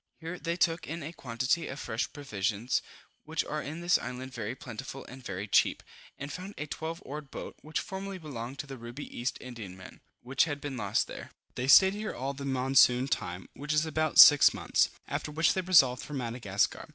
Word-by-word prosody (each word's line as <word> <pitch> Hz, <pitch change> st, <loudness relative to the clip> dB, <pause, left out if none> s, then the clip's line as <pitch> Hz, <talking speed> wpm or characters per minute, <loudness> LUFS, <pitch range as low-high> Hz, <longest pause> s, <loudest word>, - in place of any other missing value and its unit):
Here 165 Hz, +2 st, -6 dB
they 170 Hz, 0 st, -2 dB
took 165 Hz, -1 st, +1 dB
in 165 Hz, +1 st, -5 dB
a 160 Hz, +3 st, -6 dB
quantity 130 Hz, +5 st, -1 dB
of 140 Hz, -, -6 dB
fresh 115 Hz, -3 st, -3 dB
provisions, 115 Hz, -5 st, -1 dB, 0.4 s
which 160 Hz, +1 st, -2 dB
are 150 Hz, 0 st, -3 dB
in 155 Hz, +4 st, -6 dB
this 175 Hz, +1 st, +3 dB
island 130 Hz, +1 st, -6 dB
very 115 Hz, 0 st, -4 dB
plentiful 130 Hz, +2 st, -8 dB
and 130 Hz, +1 st, -11 dB
very 100 Hz, -1 st, -5 dB
cheap, -, -, +3 dB, 0.3 s
and 140 Hz, +1 st, -6 dB
found 190 Hz, +3 st, -7 dB
a 150 Hz, -, -3 dB
twelve 160 Hz, +3 st, -5 dB
oared 145 Hz, +1 st, -7 dB
boat, -, -, -7 dB
which 155 Hz, +1 st, -3 dB
formerly 195 Hz, 0 st, -5 dB
belonged 135 Hz, -6 st, -7 dB
to -, -, -5 dB
the 135 Hz, -1 st, -8 dB
Ruby 120 Hz, +5 st, -8 dB
East 120 Hz, +3 st, -2 dB
Indiaman, 100 Hz, -7 st, -9 dB, 0.2 s
which 130 Hz, +4 st, +2 dB
had 145 Hz, -3 st, -4 dB
been 145 Hz, -2 st, -5 dB
lost 105 Hz, -4 st, 0 dB
there. -, -, -9 dB, 0.2 s
They 125 Hz, -, -3 dB
stayed 190 Hz, +7 st, +8 dB
here 215 Hz, +1 st, -4 dB
all 135 Hz, +2 st, -3 dB
the 140 Hz, 0 st, -7 dB
monsoon 130 Hz, -1 st, +4 dB
time, 90 Hz, -6 st, -3 dB
which 145 Hz, +2 st, -3 dB
is 155 Hz, +1 st, +3 dB
about 155 Hz, 0 st, -1 dB
six 145 Hz, -1 st, +10 dB
months; -, -, +2 dB, 0.2 s
after -, -, -3 dB
which 160 Hz, +3 st, +3 dB
they 190 Hz, -, 0 dB
resolved 145 Hz, -9 st, +5 dB
for 150 Hz, -, -7 dB
Madagascar. 115 Hz, -6 st, -1 dB
140 Hz, 200 wpm, -30 LUFS, 125-160 Hz, 0.4 s, six